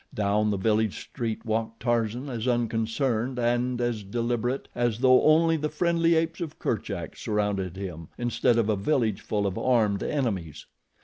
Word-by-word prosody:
Down 105 +1 +1
the 100 - 0
village 110 +1 +1
street 115 -5 -5
walked 115 0 -2
Tarzan, 120 +2 0
as 120 -2 -4
unconcerned 120 +1 0
and 120 +1 0
as 120 -3 -1
deliberate 120 +4 -2
as 120 -3 0
though 130 +1 +5
only 165 +1 +4
the 150 0 -2
friendly 170 +1 +2
apes 165 +1 0
of 160 -3 -5
Kerchak 100 -7 -3
surrounded 105 -4 -2
him 85 -5 -6
instead 120 0 +1
of 115 -2 +2
a 110 - +2
village 110 0 0
full 105 -1 -1
of 95 -2 -2
armed 110 -6 +2
enemies. 100 - -2
115 Hz, 160 wpm, -26 LUFS, 105-125 Hz, -, though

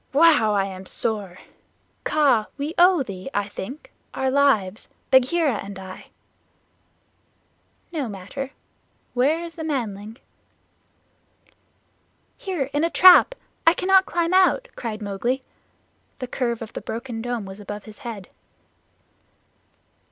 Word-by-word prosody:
"Wow! 290 -9 +5
I 195 -1 +2
am 190 -1 -8
sore. 200 -5 -3 0.7
Kaa, 270 -8 +3
we 290 +3 -3
owe 355 -4 +6
thee, 195 0 -7
I 205 0 0
think, 245 +8 -8 0.2
our 265 0 0
lives 225 -8 +2 0.2
Bagheera 260 0 +3
and 200 0 -8
I." 190 -1 -10 1.8
"No 295 -8 -3
matter. 205 +8 -6 0.6
Where 290 +7 +2
is 335 -1 -7
the 325 - -7
manling?" 225 -7 -4 2.2
"Here, 315 -9 -3
in 290 +2 +1
a 335 - +2
trap. 365 +9 +7 0.3
I 330 - +7
cannot 380 +1 +4
climb 340 0 0
out," 380 +7 +3
cried 220 -2 -5
Mowgli. 235 +7 -2 0.7
The 255 - -4
curve 240 -2 -2
of 225 - -11
the - - -5
broken 230 0 -5
dome 240 -3 -3
was 190 +1 -9
above 205 0 -7
his 215 -1 -13
head. 220 -6 -7
250 Hz, 120 wpm, -23 LUFS, 205-310 Hz, 2.2 s, trap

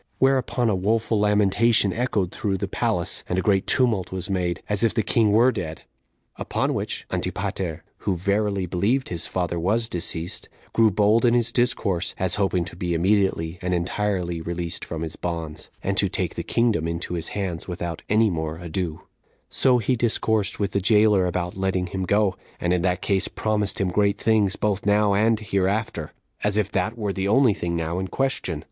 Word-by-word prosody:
Whereupon 130 -2 +2
a 105 - +2
woeful 110 +3 +1
lamentation 105 0 +3
echoed 110 -6 0
through 100 -6 -2
the - - -3
palace, - - -1
and 90 - 0
a - - +2
great 100 -2 +2
tumult 120 -9 +1
was 95 +1 -4
made, 90 -3 -1
as 105 +1 0
if 115 - +2
the 110 - +2
king 110 +1 +2
were 120 +5 +5
dead. 80 -8 -5 0.5
Upon - - -1
which - - -4
Antipater, 85 -5 -3 0.2
who 95 - -1
verily 100 +1 0
believed 105 +10 0
his 85 -2 -2
father 90 -2 -2
was 110 +7 +1
deceased, 85 -2 -2 0.2
grew 115 -1 +5
bold 105 +3 +3
in 120 -1 +4
his 120 -1 +2
discourse, 115 -8 0
as 95 -1 +1
hoping 90 -3 +1
to - - -9
be 85 -1 -2
immediately 90 -2 +1
and 90 0 0
entirely 90 -1 -1
released 85 0 -3
from 80 -1 -5
his 80 -1 -4
bonds, 80 -3 -5
and - - -1
to - - +3
take - - -2
the - - -4
kingdom 115 -9 +1
into 85 +1 -3
his 85 -2 -2
hands 90 -5 -3
without 85 -2 -4
any 110 0 +4
more 80 -1 -3
ado; 85 -1 -4 0.5
so 130 -2 +3
he 120 +2 +1
discoursed 110 -3 0
with 100 -2 0
the 100 - 0
jailer 105 -2 +4
about 90 0 -2
letting 95 -1 0
him 95 +1 -3
go, 100 0 +2 0.2
and 90 0 +1
in 90 - +1
that 90 0 0
case 100 -2 +1
promised 105 -2 -1
him 95 - +1
great 100 +2 +2
things, 105 -3 +2
both 105 -2 -1
now 105 0 +3
and 110 +2 +3
hereafter, 100 -4 -1 0.3
as 105 0 +1
if 105 -1 0
that 115 +2 -1
were 105 -3 -2
the 95 0 -2
only 120 +1 +4
thing 85 -2 -3
now 85 +1 -2
in 95 - -3
question. 115 - -1
100 Hz, 190 wpm, -24 LUFS, 90-110 Hz, 0.5 s, were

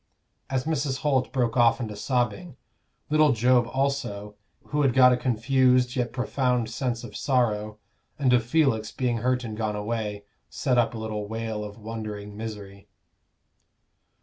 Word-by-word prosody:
As 130 -1 0
Mrs. 140 -4 -1
Holt 135 -4 +1
broke 125 -5 0
off 120 0 +4
into 110 -4 -4
sobbing, 125 - -2 0.5
little 155 -1 +5
Job 120 +1 +3
also, 130 -7 -2 0.4
who 150 - 0
had 135 -4 +2
got 125 -1 +7
a - - +3
confused 125 +1 +2
yet 120 -2 -1
profound 125 -2 0
sense 120 0 -2
of 110 -4 -9
sorrow, 110 -6 0 0.4
and 135 -4 +2
of 120 -1 +4
Felix 120 -5 +1
being 125 -1 -1
hurt 125 +2 0
and 110 -2 -5
gone 110 -1 -2
away, 105 -1 -3 0.2
set 125 -5 +1
up 120 0 +1
a - - -4
little 110 -2 -4
wail 110 -1 -4
of 105 0 -8
wondering 105 -2 -6
misery. 105 -3 -8
120 Hz, 150 wpm, -26 LUFS, 110-130 Hz, 0.5 s, got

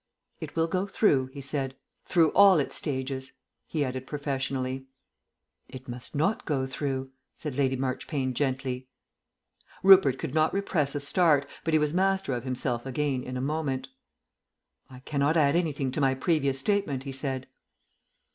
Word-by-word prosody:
"It - - -7
will 165 0 +2
go 185 +3 -1
through," 145 -10 +2
he 140 +2 -9
said. 135 -1 -3 0.3
"Through 165 -4 +4
all 200 -3 +7
its 145 - -1
stages," 130 -2 -3 0.3
he 150 -3 -1
added 130 0 -5
professionally. 135 -2 -3 0.8
"It 130 0 -10
must 120 +3 -6
not 160 +9 +1
go 135 -4 -1
through," 130 0 -3 0.2
said 150 -5 -5
Lady 135 -1 +1
Marchpane 130 +1 -2
gently. 130 -1 -2 1.0
Rupert 185 -9 +7
could - - -5
not 155 +2 +2
repress 155 -8 0
a - - 0
start, 145 -1 +3 0.2
but 165 -1 +1
he - - +5
was 150 0 0
master 190 -4 +1
of 120 0 -4
himself 125 -1 -2
again 135 0 -1
in 130 0 -5
a - - -2
moment. 135 -2 -2 1.0
"I 130 -1 -12
cannot 145 +3 +1
add 145 -1 +4
anything 145 -6 0
to 145 - -1
my 135 -1 +3
previous 140 -2 +1
statement," 145 -4 0
he 135 - -5
said. 135 -1 -3
140 Hz, 155 wpm, -28 LUFS, 130-155 Hz, 1.0 s, all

